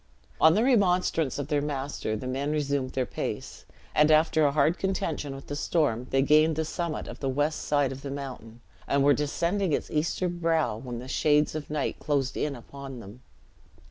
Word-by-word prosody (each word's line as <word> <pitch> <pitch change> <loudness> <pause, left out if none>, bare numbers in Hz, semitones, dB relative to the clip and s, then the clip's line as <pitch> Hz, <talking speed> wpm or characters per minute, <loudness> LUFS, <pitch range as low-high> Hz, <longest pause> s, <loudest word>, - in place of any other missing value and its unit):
On 160 +1 +7
the 220 - +3
remonstrance 180 - +2
of 145 0 -4
their 145 -2 +1
master, 140 -6 -3
the 110 - -6
men 135 +3 -2
resumed 140 -3 -1
their 130 -1 0
pace; - - -5 0.3
and 150 0 +4
after 155 0 +4
a - - +1
hard 155 +3 +2
contention 160 -7 -2
with 135 - -10
the 145 - -5
storm, 145 -6 0
they 135 0 +2
gained 155 +2 +4
the 160 +1 -1
summit 170 0 -3
of - - -8
the 135 - -1
west 145 +4 0
side 145 -2 +1
of 135 0 -7
the 140 - -6
mountain, 130 -5 -7 0.3
and 140 0 +2
were 145 +1 +6
descending 170 +5 0
its - - -2
eastern 175 +3 -1
brow, 160 -9 +1
when 120 +1 -6
the 125 +2 -8
shades 150 +2 +2
of 155 -1 -5
night 150 -2 -2
closed 140 -3 -1
in 150 -2 -1
upon 135 +1 -9
them. 115 +3 -12
145 Hz, 195 wpm, -27 LUFS, 135-155 Hz, 0.3 s, On